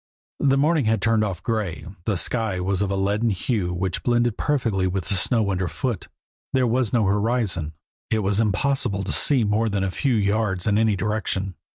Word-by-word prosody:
The 135 -1 +3
morning 150 -1 +2
had 110 0 +2
turned 115 -1 +2
off 95 -4 -3
gray, 105 -8 -2 0.2
the 105 -4 0
sky 105 +2 -1
was 95 +1 0
of 100 - 0
a 100 - -1
leaden 100 +4 +1
hue 100 -2 -1
which 90 +1 -2
blended 120 -2 +1
perfectly 115 -10 0
with 90 -2 -2
the 100 - -1
snow 105 +2 +1
underfoot, 90 -3 -2 0.5
there 130 -1 +3
was 120 -1 +1
no 115 -4 +2
horizon, 100 -6 0 0.4
it 110 -1 0
was 100 +1 +1
impossible 110 -2 0
to 100 - -3
see 135 -5 +3
more 110 +2 +1
than 100 -2 -1
a 95 - -1
few 130 +4 0
yards 100 -3 0
in 105 0 +2
any 110 -2 +3
direction. 100 -2 -2
105 Hz, 190 wpm, -23 LUFS, 95-115 Hz, 0.5 s, The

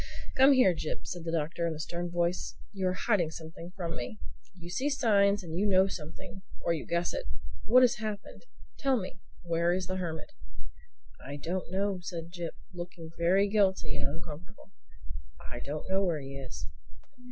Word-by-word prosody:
"Come 270 +2 +8
here, 250 -9 +6
Jip," 155 -1 -4
said 175 -2 -5
the 165 - -1
Doctor 165 +1 0
in 165 - -1
a - - -7
stern 175 +2 -3
voice. 175 +1 0 0.2
"You 190 -2 0
are 185 - +2
hiding 185 -5 +2
something 165 +2 -8
from 170 -3 -2
me. 125 - -5 0.4
You 175 -1 -9
see 265 +9 +1
signs 205 -7 +4
and 165 -2 -5
you 210 - +3
know 190 -1 +6
something—or 170 0 -4
you 160 - -4
guess 170 +1 +1
it. - - -3 0.4
What 255 +3 +7
has 245 -1 +5
happened? 215 - -5 0.3
Tell 270 -2 +3
me. 185 -5 -5 0.2
Where 170 0 +2
is 185 0 0
the 185 +1 -2
Hermit?" 160 -4 -4 0.9
"I 140 +2 -5
don't 170 +5 -3
know," 195 0 +1
said 170 -2 -5
Jip 175 -2 -4 0.2
looking 175 -2 -7
very 185 +4 +4
guilty 195 -6 +2
and 140 - -1
uncomfortable. 165 +7 -9 0.8
"I 120 - -4
don't 145 +4 -4
know 190 +1 +3
where 170 -5 +1
he 135 0 -7
is." 135 -2 -6
175 Hz, 175 wpm, -31 LUFS, 165-200 Hz, 0.9 s, Come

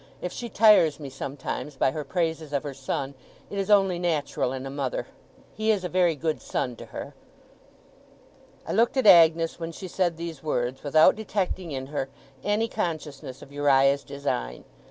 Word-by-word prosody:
If 180 - -4
she 235 - -6
tires 205 -9 +5
me, 140 -3 -7
sometimes, 135 +2 -5
by 130 - +2
her 150 +2 -4
praises 160 -1 -2
of 140 - 0
her 145 -2 -5
son, 135 +1 -4 0.4
it 200 - -3
is 195 +1 -2
only 195 -4 +4
natural 155 -7 -1
in 130 0 -5
a 135 - -5
mother. 135 -2 -3 0.5
He 215 +1 -2
is 205 -4 +2
a 180 - -3
very 175 -2 +2
good 155 +1 -2
son 125 -2 -2
to - - -10
her.' - - -7 1.5
I - - -3
looked 230 +5 +2
at 260 - +2
Agnes 165 -3 +6
when 165 0 -4
she 185 +3 -8
said 175 -2 0
these 165 -4 -6
words, 130 -4 -2
without 155 +2 +5
detecting 190 -5 -3
in 130 -1 -4
her 135 -1 -4 0.3
any 210 +2 +1
consciousness 150 - -5
of 140 - -14
Uriah's 140 -1 +3
design. - - -4
155 Hz, 175 wpm, -26 LUFS, 140-180 Hz, 1.5 s, Agnes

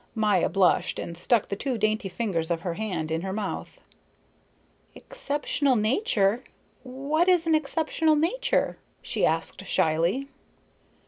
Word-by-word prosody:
Maya 215 -2 +2
blushed 190 -2 +2
and 170 - -5
stuck 210 +6 +1
the 200 - -2
two 255 +4 -2
dainty 215 -2 0
fingers 180 -5 -2
of 170 -1 -1
her 175 -1 -3
hand 175 -6 -3
in 160 +1 -1
her 190 +1 -4
mouth. 205 0 -5 1.2
"Exceptional 290 - -1
nature 220 - +1 0.4
what 280 +6 -1
is 355 -3 +4
an 325 - +2
exceptional 315 +1 +1
nature?" 355 +12 0 0.2
she - - +1
asked - - -2
shyly. 170 - +1
220 Hz, 130 wpm, -26 LUFS, 190-295 Hz, 1.2 s, is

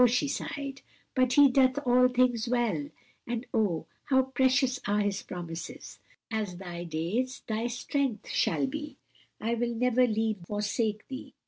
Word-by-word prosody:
she 250 +5 +1
sighed. 280 0 -4 0.3
"'But 255 -1 +3
He 285 +1 +8
doeth 260 0 +4
all 250 0 +6
things 245 -2 +2
well,' 225 -12 +1 0.4
and 235 +1 -3
oh 200 -7 +1 0.2
how 265 -1 +4
precious 260 0 +2
are 205 +1 +2
His 205 -1 0
promises! 175 -2 -7 0.3
'As 210 -5 -2
thy 175 -2 -6
days 180 +11 -2
thy 225 +2 -1
strength 245 0 -2
shall - - +1
be.' 300 +2 -5 0.4
'I 230 +2 -1
will 235 0 -1
never 250 +1 +3
leave 220 -1 0
thee 175 - -14
nor 205 - -2
forsake 210 +1 -1
thee.' 265 0 -8
240 Hz, 155 wpm, -29 LUFS, 210-255 Hz, 0.4 s, He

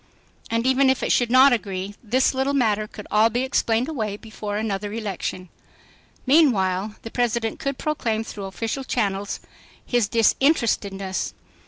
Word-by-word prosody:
And 230 +1 0
even 265 +1 +4
if 265 - +1
it - - +1
should 245 -2 +2
not 260 +2 +7
agree, 195 -3 -3
this 255 +5 +2
little 265 +2 0
matter 215 -5 +1
could 210 -1 -10
all 215 +2 +5
be 240 +3 -1
explained 245 -2 +1
away 215 -10 -3
before 210 -1 -6
another 205 -1 -2
election. 195 -4 -4 0.8
Meanwhile 215 - +3
the 225 - -7
President 235 -2 -1
could 275 -1 -3
proclaim 230 -8 -1
through 205 -3 -7
official 225 +7 -4
channels 205 -5 -2 0.5
his 240 -4 +1
disinterestedness. 210 -5 +1
225 Hz, 145 wpm, -23 LUFS, 205-255 Hz, 0.8 s, not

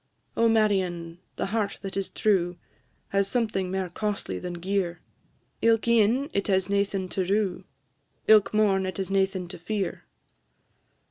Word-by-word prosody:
"O 230 0 +4
Marion! 185 -6 +1 0.2
the - - -2
heart 205 0 -1
that 195 - -5
is 195 -1 -2
true, 180 -4 +1 0.5
Has 200 0 +1
something 215 -5 -1
mair 190 0 -1
costly 205 +3 -3
than 180 -1 -5
gear! 175 0 -2 0.6
Ilk 225 0 +3
e'en 235 +4 +3
it 200 - 0
has 190 -1 +1
naething 200 -1 0
to 190 - -1
rue, 195 0 0 0.6
Ilk 215 -2 +6
morn 195 -3 +2
it 185 - -5
has 195 0 -3
naething 190 -2 +1
to 180 -1 -9
fear. 195 0 -3
195 Hz, 145 wpm, -26 LUFS, 185-215 Hz, 0.6 s, Ilk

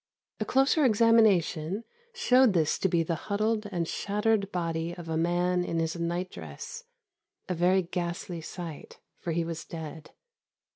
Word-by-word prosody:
A - - -1
closer 270 +4 +3
examination 210 - +3 0.3
showed 255 - +4
this 160 -4 +2
to 190 - +2
be 170 -1 +2
the 165 - -1 0.2
huddled 215 +1 0
and 170 -3 -1
shattered 205 +1 0
body 165 -1 -2
of 175 -2 -9
a 160 - -1
man 175 +2 +1
in 170 - -2
his 165 0 0
night 175 +2 -2
dress; 470 +1 -8 0.6
a 185 - -1
very 180 +2 +3
ghastly 175 -1 -4
sight, 165 -2 -8 0.2
for 170 - -3
he 165 +1 0
was 165 -1 -5
dead. 160 -1 -8
175 Hz, 150 wpm, -28 LUFS, 165-210 Hz, 0.6 s, showed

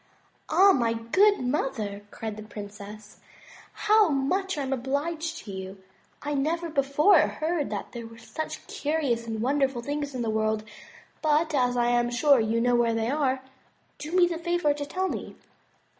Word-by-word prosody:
"Ah! 380 +5 +6
my 235 -8 +2
good 375 - +3
mother," 245 -6 -2
cried 220 -1 -6
the 215 - -8
princess, 210 0 -10 0.7
"how 425 -3 +5
much 335 +7 0
am 270 -2 -1
I - - 0
obliged 310 +6 -2
to 205 - -7
you! 190 0 -8 0.4
I 295 0 -2
never 325 +4 -1
before 295 +6 +4
heard 310 0 0
that - - -5
there 235 -2 -7
were 230 0 -13
such 315 +7 -6
curious 280 -6 -1
and 220 -1 -3
wonderful 270 -2 +1
things 285 0 -3
in 245 - -2
the 225 - -1
world; 215 0 0 0.6
but 310 +1 +2
as 250 -3 +2
I 240 0 +2
am 240 0 +2
sure 255 +3 +4
you 225 +1 +1
know 245 +1 +2
where 235 -1 +2
they 225 +2 0
are, 265 -3 0 0.6
do 300 - -6
me 365 -1 +6
the 340 -2 -3
favor 345 -3 +1
to 290 0 -5
tell 375 +4 -1
me." - - -5
270 Hz, 175 wpm, -27 LUFS, 230-315 Hz, 0.7 s, Ah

